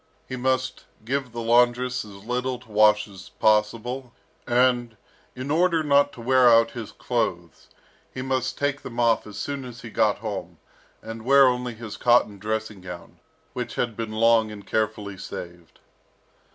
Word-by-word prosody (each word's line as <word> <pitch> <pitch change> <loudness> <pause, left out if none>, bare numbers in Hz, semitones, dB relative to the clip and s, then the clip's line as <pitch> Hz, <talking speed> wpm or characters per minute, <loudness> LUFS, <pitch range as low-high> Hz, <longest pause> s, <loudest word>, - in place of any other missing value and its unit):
He 130 - -5
must 130 0 -1 0.2
give 135 0 -2
the 115 0 -5
laundress 125 +2 +2
as 100 -1 -13
little 125 +1 -2
to 120 -2 -18
wash 105 0 +4
as 95 -2 -12
possible; 115 +4 0 0.3
and, 120 -2 +2 0.4
in 130 +3 -5
order 165 0 +3
not 145 -1 +4
to 120 - -10
wear 130 +1 +5
out 115 0 +5
his 115 -3 -7
clothes, 85 - -3 0.4
he 130 - -5
must 130 -1 -1
take 145 0 -1
them 120 -1 -7
off 115 -2 +2
as 105 0 -9
soon 140 +3 -4
as 125 -1 -10
he 115 - -8
got 105 -1 +2
home, 105 -2 -6 0.5
and 115 0 -7
wear 135 +2 +6
only 125 -2 0
his 110 -1 -8
cotton 120 -4 +3
dressing 110 -1 -3
gown, 90 -1 -10 0.3
which - - -5
had 115 -3 -1
been 115 -1 -4
long 115 0 +4
and 100 -2 -10
carefully 105 -2 -2
saved. 85 -3 -9
115 Hz, 165 wpm, -24 LUFS, 110-125 Hz, 0.5 s, wear